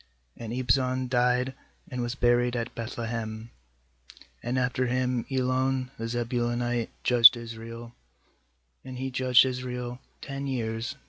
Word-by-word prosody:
10And 115 Hz, -1 st, -6 dB
Ibzan 130 Hz, 0 st, +1 dB
died, 125 Hz, +1 st, +2 dB, 0.3 s
and 125 Hz, -1 st, -4 dB
was 120 Hz, +1 st, -2 dB
buried 120 Hz, -1 st, +2 dB
at 120 Hz, 0 st, -3 dB
Beth 115 Hz, +1 st, -6 dB
lehem. 115 Hz, -1 st, -4 dB, 0.9 s
nAnd 120 Hz, +2 st, -1 dB
after 125 Hz, 0 st, +1 dB
V>iin 125 Hz, 0 st, -1 dB
Elon 130 Hz, 0 st, 0 dB
the 115 Hz, -, -3 dB
Zebulunite 120 Hz, 0 st, -1 dB
judged 125 Hz, 0 st, +8 dB
Israel; 115 Hz, 0 st, -8 dB, 0.9 s
and 130 Hz, -1 st, -8 dB
he 130 Hz, +1 st, -3 dB
judged 130 Hz, 0 st, +5 dB
Israel 125 Hz, -1 st, -4 dB, 0.2 s
ten 140 Hz, 0 st, -5 dB
years. 115 Hz, 0 st, -3 dB
125 Hz, 125 wpm, -27 LUFS, 120-130 Hz, 0.9 s, judged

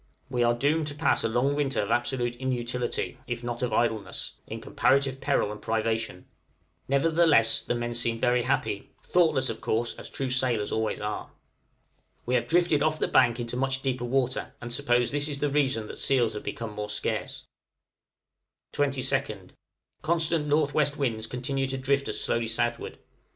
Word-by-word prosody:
We 125 Hz, -2 st, 0 dB
are 120 Hz, 0 st, +3 dB
doomed 150 Hz, +5 st, +1 dB
to 145 Hz, -, -5 dB
pass 150 Hz, -, +2 dB
a -, -, +2 dB
long 125 Hz, +5 st, +1 dB
winter 140 Hz, -2 st, 0 dB
of 100 Hz, -, -1 dB
absolute 120 Hz, 0 st, 0 dB
inutility, 125 Hz, -1 st, -2 dB
if 120 Hz, 0 st, -4 dB
not 120 Hz, 0 st, -4 dB
of 125 Hz, -2 st, 0 dB
idleness, 110 Hz, -3 st, -1 dB
in -, -, -6 dB
comparative 135 Hz, -1 st, +1 dB
peril 105 Hz, -, +1 dB
and 105 Hz, -, -8 dB
privation; 110 Hz, -4 st, -1 dB, 0.6 s
nevertheless 150 Hz, -3 st, +4 dB
the -, -, -2 dB
men 120 Hz, 0 st, -2 dB
seem 115 Hz, -1 st, -1 dB
very 125 Hz, 0 st, +3 dB
happy -, -, -1 dB
thoughtless, 155 Hz, -7 st, +3 dB
of 115 Hz, -, -8 dB
course, 115 Hz, +1 st, 0 dB
as -, -, -6 dB
true 135 Hz, -2 st, -3 dB
sailors 125 Hz, -5 st, +1 dB
always 110 Hz, 0 st, -1 dB
are. 105 Hz, 0 st, -4 dB, 1.0 s
We 125 Hz, -, -1 dB
have -, -, +2 dB
drifted 170 Hz, -3 st, +3 dB
off 155 Hz, +1 st, +2 dB
the -, -, 0 dB
bank 125 Hz, -2 st, +4 dB
into 120 Hz, 0 st, -3 dB
much 135 Hz, +1 st, -1 dB
deeper 130 Hz, -2 st, -1 dB
water, 130 Hz, 0 st, -1 dB
and 120 Hz, -1 st, -5 dB
suppose 120 Hz, -3 st, +2 dB
this 145 Hz, +1 st, 0 dB
is 145 Hz, -2 st, -4 dB
the 145 Hz, 0 st, -1 dB
reason 135 Hz, -6 st, +1 dB
that -, -, -7 dB
seals 120 Hz, -5 st, +2 dB
have 105 Hz, -, -5 dB
become 115 Hz, -2 st, -5 dB
more 105 Hz, 0 st, -5 dB
scarce. 105 Hz, -, -2 dB, 1.3 s
22nd. 135 Hz, -8 st, -1 dB, 0.5 s
Constant 165 Hz, -1 st, +2 dB
N.W. 150 Hz, 0 st, +2 dB
winds 115 Hz, -5 st, -1 dB
continue 135 Hz, +3 st, -2 dB
to 135 Hz, 0 st, -1 dB
drift 140 Hz, +1 st, 0 dB
us -, -, -2 dB
slowly 115 Hz, -1 st, 0 dB
southward. 120 Hz, +1 st, -1 dB
125 Hz, 170 wpm, -27 LUFS, 115-140 Hz, 1.3 s, nevertheless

